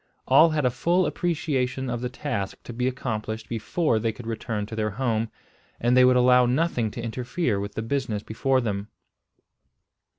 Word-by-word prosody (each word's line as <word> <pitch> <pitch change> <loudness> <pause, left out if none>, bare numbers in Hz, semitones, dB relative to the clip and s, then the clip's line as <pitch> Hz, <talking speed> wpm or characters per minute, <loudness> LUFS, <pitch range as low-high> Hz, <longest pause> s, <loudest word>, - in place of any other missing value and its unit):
All 150 +5 +7
had 155 -3 0
a 125 - +3
full 175 +8 +2
appreciation 140 -6 -1
of 120 -1 -3
the 125 - -2
task 125 -7 -3
to 120 - -8
be 125 +2 -1
accomplished 110 -4 -3
before 115 +3 0
they 115 +1 0
could 115 +2 -11
return 110 -2 -3
to 110 - -7
their 110 -1 0
home, 115 0 -1 0.5
and 120 +1 +2
they 130 - +7
would 125 0 +5
allow 125 0 +5
nothing 125 -4 +1
to 115 +2 -7
interfere 125 - -1
with 100 +1 -5
the 110 - -2
business 115 -4 -2
before 130 +4 +1
them. 100 -3 -3
125 Hz, 175 wpm, -25 LUFS, 110-130 Hz, 0.5 s, All